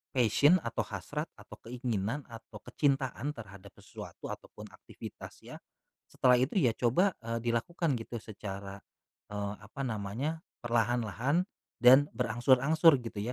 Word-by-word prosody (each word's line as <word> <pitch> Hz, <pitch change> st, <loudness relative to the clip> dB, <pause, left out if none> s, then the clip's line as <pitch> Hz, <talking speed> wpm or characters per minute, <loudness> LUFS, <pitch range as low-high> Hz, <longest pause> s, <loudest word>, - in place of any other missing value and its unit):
passion 130 Hz, -, +5 dB
atau 115 Hz, 0 st, -4 dB
hasrat 125 Hz, -, -4 dB
atau -, -, -13 dB
keinginan 120 Hz, +1 st, -2 dB
atau 115 Hz, -1 st, -12 dB
kecintaan 140 Hz, 0 st, 0 dB
terhadap 100 Hz, -4 st, -11 dB
sesuatu -, -, -9 dB
atau -, -, -8 dB
pun -, -, -9 dB
aktivitas -, -, -11 dB
ya. -, -, -10 dB, 0.5 s
Setelah 125 Hz, -1 st, +4 dB
itu 130 Hz, +8 st, 0 dB
ya 120 Hz, -, +4 dB
coba, 175 Hz, -, +3 dB
eee, 115 Hz, 0 st, -3 dB
dilakukan 125 Hz, +4 st, 0 dB
gitu 115 Hz, -, -7 dB
secara, 100 Hz, -2 st, -7 dB, 0.5 s
eee, 100 Hz, 0 st, -3 dB
apa 105 Hz, +7 st, -8 dB
namanya, 120 Hz, +7 st, -3 dB, 0.2 s
perlahan-lahan 120 Hz, -, +1 dB, 0.4 s
dan 135 Hz, +4 st, +8 dB
berangsur-angsur 130 Hz, +7 st, +4 dB
gitu 115 Hz, -3 st, -6 dB
120 Hz, 125 wpm, -31 LUFS, 110-140 Hz, 0.5 s, dan